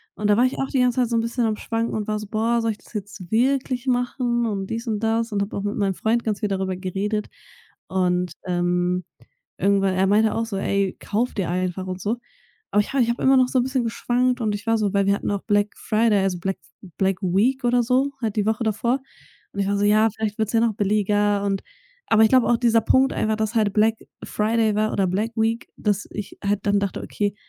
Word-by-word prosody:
Und 210 - -1
da 205 - +5
war 245 - +5
ich 255 - -1
auch 270 - 0
die 265 - 0
ganze 250 0 +2
Zeit 245 - +1
so 235 - 0
'n - - +2
bisschen 235 +1 -1
am 220 -1 0
Schwanken 230 +1 -2
und 215 -1 -3
war 215 0 -1
so: 210 - -7
„Boah, 230 +3 +1
soll 225 - +1
ich 215 - -8
das - - -20
jetzt 205 -3 -7
wirklich 255 +1 +1
machen?“ 245 -1 0
Und 195 -2 -3
dies 230 +2 -4
und 215 -2 -1
das 225 0 0
und 200 -1 0
habe 200 - -6
auch 200 - -3
mit 205 0 -2
meinem 195 -2 +1
Freund 230 +4 0
ganz 215 -2 -2
viel 210 -3 -1
darüber 190 -1 -1
geredet. 200 +3 -2 0.6
Und, 180 -1 0 0.2
ähm, 180 0 0 0.5
irgendwann 195 -1 +2
er 190 +1 +2
meinte 215 +2 +3
auch 225 - 0
so: 200 - -4
„Ey, 195 0 0
kauf 230 +4 -1
dir 190 -5 -1
einfach“, 185 +1 -2
und 185 0 -5
so. 215 +3 0 0.6
Aber 210 - +4
ich - - -6
habe 275 - +3
ich 230 - -1
habe 235 - -2
immer 265 0 +5
noch 255 -1 +4
so 255 - +2
'n - - +2
bisschen 260 -1 -1
geschwankt. 245 +2 0
Und 210 -2 0
ich 215 +3 -9
war 225 - +3
so 205 -2 -1
weil 200 -1 +2
wir 200 - +4
hatten 200 - -3
auch 200 - -2
Black 205 -1 +2
Friday, 220 -1 +2
also, 185 -2 0
Black 195 +2 -2
F - - -25 0.3
Black 190 -1 +1
Week 210 +9 +1
oder 245 0 +3
so? 260 +4 +1
Halt 220 -3 -2
die 205 - +1
Woche 220 +2 0
davor. 235 +5 0 0.5
Und 200 - -6
ich 195 - 0
war 200 - +1
so: 205 - +1
„Ja, 215 +2 +4
vielleicht 215 -1 -3
wird's 220 -1 0
ja 225 - +4
noch 230 -2 +2
billiger“, 205 0 +1
und 195 -1 -1 0.5
aber 220 0 +5
ich 220 - +5
glaube 255 -2 +4
auch 240 - +3
dieser 230 -1 +3
Punkt 265 +4 +3
einfach, 215 0 0
dass 220 +1 -1
halt 210 -3 +2
Black 220 +1 +3 0.3
Friday 220 0 +1
war 215 +1 +1
oder 195 -1 +1
Black 205 +5 -1
Week 225 +1 0
dass 205 -1 -1
ich 205 -2 -7
halt 200 0 +1
dann 200 0 +3
dachte: 200 -1 -3
„Okay, 205 -1 -2
215 Hz, 250 wpm, -23 LUFS, 200-230 Hz, 0.6 s, da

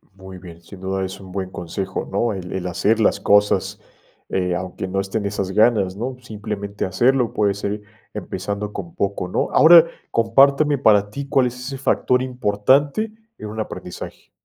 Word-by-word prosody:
Muy 95 -1 -11
bien, 85 -2 -12
sin 95 +3 -13
duda, 95 0 -2
es 95 +1 -7
un 95 -2 -12
buen 95 -1 -4
consejo, 95 +2 -5
¿no?, 110 +3 0
el 90 -2 -7
el 90 -1 -3
hacer 105 +6 +1
las 110 - +2
cosas, 105 0 +2 0.5
eh, 90 -2 0
aunque 90 +1 -5
no 95 +1 -2
estén 100 +2 -2
esas 100 -1 -2
ganas, 105 -3 +3
¿no?, 125 +4 -4
simplemente 105 -2 -5
hacerlo, 120 +6 +2
puede 105 -2 +2
ser 100 +1 -4 0.3
empezando 105 0 -5
con 85 -2 -7
poco, 100 -2 -2
¿no?, 90 - -1
ahora, 165 0 +8 0.3
compárteme, 140 +6 +4
¿para 105 -5 +4
ti 140 +4 -6
cuál 135 -2 +3
es 125 - -6
ese 135 +2 -6
factor 125 -1 +1
importante 130 - +1 0.3
en 105 - -7
un 110 +1 -7
aprendizaje? 110 - -7
105 Hz, 170 wpm, -21 LUFS, 95-125 Hz, 0.5 s, ahora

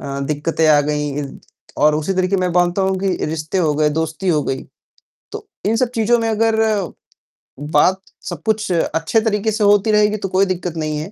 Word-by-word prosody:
अ, 140 -1 -5
दिक्कतें 150 +3 -1
आ 145 -1 +6
गईं 150 -1 -2
इ - - -5 0.6
और 150 0 +5
उसी 155 +5 -1
तरह 185 0 +1
के 195 - +1
मैं 185 -1 0
मानता 175 +2 +1
हूँ 190 0 0
कि 195 - -1 0.2
रिश्ते 155 +3 -3
हो 160 -4 +2
गए, 150 0 +2
दोस्ती 160 +4 -3
हो 155 -4 +2
गई, 135 0 -3 0.7
तो - - -8 0.2
इन 220 - +2
सब 240 +1 +1
चीज़ों 230 +2 +3
में 225 - -1
अगर 225 0 +1 1.2
बात 185 +6 +4 0.3
सब - - -7
कुछ 215 -3 0
अच्छे 165 +4 0
तरीके 220 0 0
से 215 0 -1
होती 205 +1 +4
रहेगी, 210 0 +3
तो 195 - -4
कोई 190 +2 +2
दिक्कत 180 -2 -3
नहीं 155 -1 -2
है 160 +6 -7
185 Hz, 205 wpm, -18 LUFS, 155-210 Hz, 1.2 s, आ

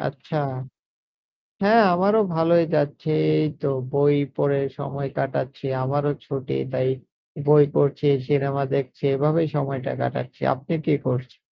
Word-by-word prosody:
আচ্ছা। 145 +3 -5 1.3
হ্যাঁ, 220 +3 +6
আমারও 200 +5 +3
ভালোই 165 +1 +4
যাচ্ছে 145 +1 -1 0.3
এই 155 0 +2
তো 145 - +1 0.2
বই 145 +1 +4 0.2
পড়ে 140 -1 +1 0.2
সময় 140 -1 -4
কাটাচ্ছি। 135 0 -3 0.2
আমারও 145 +2 0 0.2
ছুটি। 135 - -4 0.2
তাই 130 - 0 0.6
বই 150 0 +7
পড়ছি, 145 +1 +1 0.2
সিনেমা 140 -1 +1
দেখছি। 135 +1 -3
এভাবেই 155 +3 +2
সময়টা 135 -2 -2
কাটাচ্ছি। 65 0 -4
আপনি 140 +5 -5
কি 155 - +3
করছেন? 125 -1 -3
145 Hz, 125 wpm, -23 LUFS, 135-155 Hz, 1.3 s, বই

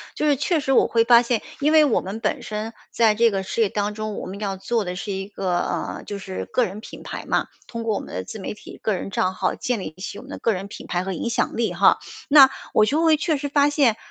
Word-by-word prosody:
就 - - -1
是 290 - +4
确 310 +5 +1
实 280 -2 -1
我 265 - +5
会 230 -1 +3
发 235 0 +7
现 240 -2 0 0.2
因 295 +2 +2
为 310 -1 +7
我 270 - +2
们 195 +4 -6
本 215 -2 -1
身 215 +1 -5 0.2
在 225 -2 +4
这 230 +2 +4
个 195 -2 -2
事 210 +4 -2
业 215 - +3
当 205 +1 -1
中， 215 -1 -4
我 - - -5
们 195 +2 -7
要 195 -2 -3
做 225 +3 -1
的 180 0 -4
是 200 +2 -5
一 195 0 -4
个 185 -3 -1
呃， - - -3
就 205 - -5
是 190 -1 -5
个 250 - +1
人 195 0 -7
品 - - -11
牌 - - -6
嘛， - - +1 0.2
通 230 -1 -5
过 225 -2 0
我 - - -1
们 - - -10
的 90 - -3
自 215 - -8
媒 190 - -4
体 210 - -12
个 215 - 0
人 190 - -4
账 185 -1 0
号 185 0 0
建 245 -3 -2
立 170 -4 -6
起 190 +2 -6
我 - - -9
们 265 - -14
的 - - -6
个 230 - +1
人 190 +1 -5
品 200 - -10
牌 175 0 -1
和 190 - -3
影 235 - -3
响 235 - 0
力 225 -5 0
哈。 185 +3 +4 0.3
那 275 -2 +9 0.2
我 215 - +5
就 295 +9 +1
会 320 -1 +5
确 310 -1 0
实 285 - -3
发 285 0 +3
现， 280 -7 +3
215 Hz, 305 characters per minute, -23 LUFS, 195-250 Hz, 0.3 s, 那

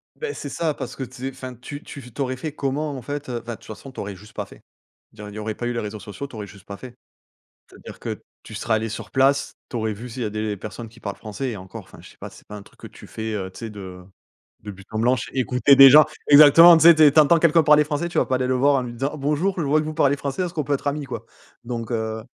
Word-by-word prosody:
Beh 455 -2 -5
c'est 145 - -6
ça 155 +1 -2
parce - - -7
que - - -9
tu 130 - -10
sais 130 +1 -4
enfin 130 -1 -9
tu 145 +4 -9
tu 140 - -10
f 125 -3 -13
tu 140 - -5
aurais 130 -1 -2
fait 155 +3 -5
comment 145 +1 -2
en 130 - -7
fait, 145 +2 -6
heu? 120 -1 -3
Enfin 120 0 -6
de - - -9
toute - - -20
façon 130 +5 -10
tu - - -11
aurais 100 -1 -5
juste 105 +3 -16
pas - - -4
fait. - - -17 0.5
Il 110 - -26
y - - -7
aurait 105 - -8
il - - -12
y - - -5
aurait 110 0 -4
pas 120 - -5
eu 120 - -1
les 120 - -2
réseaux 105 0 -6
sociaux, 105 +7 -8
tu 130 - -14
aurais 105 -1 -6
juste 100 0 -16
pas 100 0 -8
fait. 125 -2 -11 0.8
C'est-à-dire - - -13
que - - -5 0.2
tu 110 - -11
serais 110 +1 -1
allée 110 +1 0
sur 105 - -8
place, 135 +1 +2 0.2
tu - - -8
aurais 110 -2 -1
vu 120 +5 -9
s'il 120 +1 -5
y - - -1
a 105 - -3
des 105 -1 -3
personnes 110 +3 -8
qui 115 +2 -19
parlent 100 -3 -6
français 110 +4 -5
et 105 - -6
encore, 95 0 -10
enfin - - -17
je - - -14
sais - - -20
pas, - - -9
c'est - - -18
pas 105 - -9
un 100 - -9
truc - - -23
que - - -9
tu - - -15
fais, 110 0 -5
heu, 95 -2 -5
tu - - -13
sais 115 -1 -6
de 95 -3 -10 0.6
de 105 - -7
but 95 0 -12
en 110 - -2
blanc, 125 +3 +3
ch 125 +2 -6
écouter 130 +1 +3
des 135 0 +11
gens. 150 +3 +8 0.2
Exactement 155 +4 +9
tu 160 - +2
sais, 170 0 +9
tu 155 -1 +5
entends 165 +3 +5
quelqu'un 165 0 +4
parler 150 0 +5
français 155 +3 -3
tu - - -2
vas - - +2
pas 130 - -1
aller 125 0 0
le 130 - 0
voir 140 +3 +3
en 130 - +1
lui 120 - -6
disant: 135 +5 -3
«Bonjour 150 +7 0
je 170 - 0
vois 150 +2 +2
que 155 - -5
vous 155 - -5
parlez 145 -3 +2
français, 140 +5 -3
est-ce 175 - -5
qu'on 155 -4 -2
peut 145 - 0
être 140 - -5
amis 145 0 -3
quoi?» - - -7 0.4
donc 120 -1 -5
heu 110 -1 -3
130 Hz, 315 wpm, -22 LUFS, 110-145 Hz, 0.8 s, des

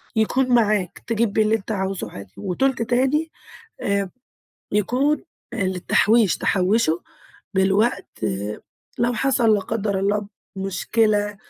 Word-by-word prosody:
يكون 250 +4 +2
معاك 215 -7 +2
تجيب 230 -2 +1
بيه 220 - +3
اللي 215 +1 +2
أنت 220 0 -5
عاوزه 190 -2 -2
عادي، 100 -1 -10
وتُلت 235 +7 0
تاني 265 +7 +1 0.5
آآ 200 -1 0 0.6
يكون 255 +9 +1 0.3
للتحويش، 200 +1 +2
تحوّشه 185 -3 +1 0.5
للوقت 195 +5 +2 0.9
لو 240 +1 +2
حصل- 235 -2 +3
لا 205 - +1
قدر 200 -2 -2
الله- 205 +1 0 0.3
مشكلة، 205 +2 0
210 Hz, 110 wpm, -22 LUFS, 195-235 Hz, 0.9 s, بيه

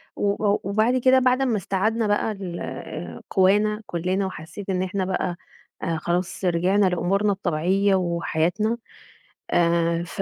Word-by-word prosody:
و 205 0 +1
وبعد 220 +5 +2
كده 260 +1 +5
بعد 255 +1 +2
ما 240 -5 +1
استعدنا 210 +4 0
بقى 205 +2 +1
ال 190 -4 -6
قوانا 210 +3 +3
كلنا، 185 +3 -1
وحسيت 190 +2 -8
إن 185 0 0
إحنا 190 0 -2
بقى 180 -2 -1 0.6
خلاص 175 +3 -2
رجعنا 185 +3 +3
لأمورنا 195 +3 +1
الطبيعية 190 +1 +1
وحياتنا، 180 +4 0 0.7
آآ، 170 0 +2
ف 175 +3 -5
195 Hz, 125 wpm, -24 LUFS, 175-210 Hz, 0.7 s, كده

